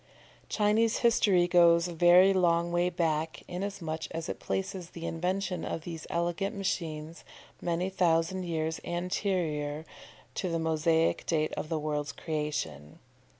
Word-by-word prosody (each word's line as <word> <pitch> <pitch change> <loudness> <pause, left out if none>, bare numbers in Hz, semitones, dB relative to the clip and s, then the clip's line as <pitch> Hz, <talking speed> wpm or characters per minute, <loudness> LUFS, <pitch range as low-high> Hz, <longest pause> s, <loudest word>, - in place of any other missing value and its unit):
Chinese 215 +1 +2
history 195 -6 +4
goes 170 -1 +5
a 175 - -6
very 175 +3 +6
long 170 -2 +2
way 175 +1 +2
back, 160 -2 -1
inasmuch 175 -4 -4
as 165 0 -5
it - - -5
places 190 -2 -3
the 170 -1 -8
invention 180 +1 -2
of 165 - -3
these 165 -1 -7
elegant 175 +4 -1
machines 165 -4 -3 0.4
many 175 +1 -1
thousand 185 0 +1
years 160 -2 -2
anterior 175 -4 -2 0.5
to 185 - -2
the 165 - 0
Mosaic 160 0 +1
date 155 -2 +1
of 155 - -4
the 165 - 0
world's 150 -1 -2
creation. 150 - -4
170 Hz, 135 wpm, -29 LUFS, 160-180 Hz, 0.5 s, very